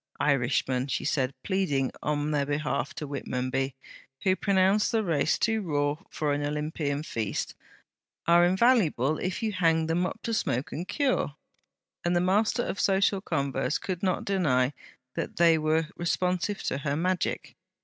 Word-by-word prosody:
'Irishmen;' 130 -2 +1
she - - -2
said, 130 -2 +1
pleading 160 -10 0
on 150 0 -1
their 145 -2 0
behalf 145 -1 -1
to 150 - -4
Whitmonby, 135 -1 -2 0.5
who 185 -1 +3
pronounced 195 +1 +2
the 225 -1 +1
race 160 -5 +1
too 225 -1 +1
raw 145 -5 0
for 150 -2 -1
an 145 0 -1
Olympian 150 0 -2
feast, 110 -9 -3 0.7
'are 170 +1 +6
invaluable 180 - +3
if 185 +5 -3
you 220 - +1
hang 165 -4 +2
them 170 +3 +1
up - - -7
to 230 - -2
smoke 145 - -1
and 175 +4 -5
cure'; 260 - 0 0.7
and 175 +1 +1
the - - +4
master 210 +6 +2
of 195 - -4
social 195 0 +2
converse 140 -4 -1
could 185 -3 -4
not 185 -2 0
deny 145 -9 +2 0.4
that - - -4
they 170 -1 +5
were 155 +1 +1
responsive 180 +3 -1
to 135 - -1
her 140 0 -1
magic. 180 +3 -1
160 Hz, 155 wpm, -28 LUFS, 145-185 Hz, 0.7 s, are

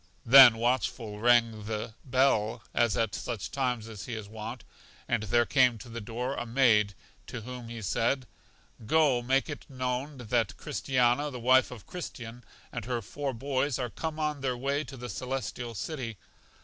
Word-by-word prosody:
Then 125 -2 +10
Watchful 115 -3 -1
rang 115 -2 +3
the 110 0 -4 0.2
hell, 120 -4 +2
as 120 -2 +2
at 115 -2 0
such 115 -5 -4
times 125 -5 -1 0.2
he 120 - -4
is 110 -2 -6
wont, 110 +1 -7 0.4
and 120 -3 +1
there 120 +3 +2
came 125 -3 +4
to 120 - -11
the 115 0 -6
door 120 +5 -3
a - - -3
maid, 115 -5 +3 0.3
to 120 - -6
whom 125 +1 -8
he 115 -2 -7
said: 120 +7 0 0.6
Go, 145 -4 +4
make 135 +3 +1
it 145 -2 -8
known 130 +2 -3
that 115 -3 -1
Christiana, 135 -1 +1
the 125 -3 -7
wife 130 +2 +4
of 115 -6 -10
Christian, 120 -9 -8 0.3
and - - -5
her 120 -2 -2
four 140 +6 -4
boys 135 +2 -1
are 125 -3 -3
come 160 -1 -4
on 150 -2 -1
their 130 -2 -1
way 140 +4 -1
to 135 - -10
The 125 0 -6
Celestial 120 +1 -4
City.. 115 - -4
125 Hz, 170 wpm, -29 LUFS, 115-135 Hz, 0.6 s, Then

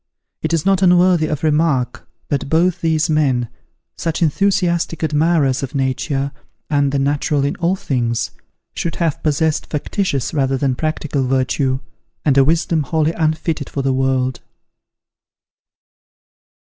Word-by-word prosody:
It - - -2
is 165 -2 0
not 195 -1 +3
unworthy 180 -3 +4
of 150 -1 -3
remark, 150 -5 +1 0.2
that 140 -1 -1
both 170 +3 +2
these 160 -1 +1
men, 135 -7 +1 0.5
such 165 +1 -2
enthusiastic 170 0 +1
admirers 155 -3 +2
of 135 +1 -5
Nature 135 +1 -1 0.4
and 140 -1 +2
the 140 - 0
natural 145 +1 +1
in 140 - -1
all 175 +3 +1
things, 120 - -1 0.4
should 170 - -3
have 165 -4 -1
possessed 155 +1 0
factitious 145 - -2
rather 135 -3 +1
than 135 -1 +1
practical 150 -2 -2
virtue, 130 +1 0 0.4
and 145 -3 +3
a 135 - +6
wisdom 160 +2 +1
wholly 155 +3 0
unfitted 155 -2 -1
for 140 - -3
the 135 -1 +1
world. 130 -1 0
150 Hz, 135 wpm, -18 LUFS, 135-165 Hz, 0.5 s, a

